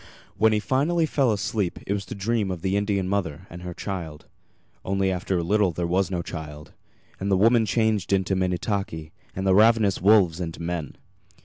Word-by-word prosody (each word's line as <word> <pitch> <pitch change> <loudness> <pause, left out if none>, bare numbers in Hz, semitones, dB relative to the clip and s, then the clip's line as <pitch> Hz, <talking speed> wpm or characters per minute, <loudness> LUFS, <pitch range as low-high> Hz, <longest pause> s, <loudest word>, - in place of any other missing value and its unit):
When 110 0 +4
he 105 - +2
finally 150 +9 +1
fell 135 -5 +1
asleep 100 -3 -1
it 100 - -1
was 100 -2 -4
to 120 - -6
dream 105 0 -1
of 90 -2 -5
the 95 0 0
Indian 100 -2 0
mother 95 -4 -2
and 85 +1 -9
her 90 -1 -7
child; 85 -6 -6 0.6
only 95 0 0
after 95 0 -1
a 85 - -1
little 100 +2 +2
there 85 +1 -3
was 95 +3 +1
no 90 -2 -2
child, 75 -3 -8 0.5
and 100 - -2
the 95 - +3
woman 115 +2 +4
changed 110 -2 +1
into 95 -1 +1
Minnetaki, 90 -3 -2 0.2
and 95 - -3
the 95 - +4
ravenous 110 -1 +4
wolves 95 -4 +4
into 85 -2 -5
men. 85 -3 -4
95 Hz, 190 wpm, -24 LUFS, 90-105 Hz, 0.6 s, When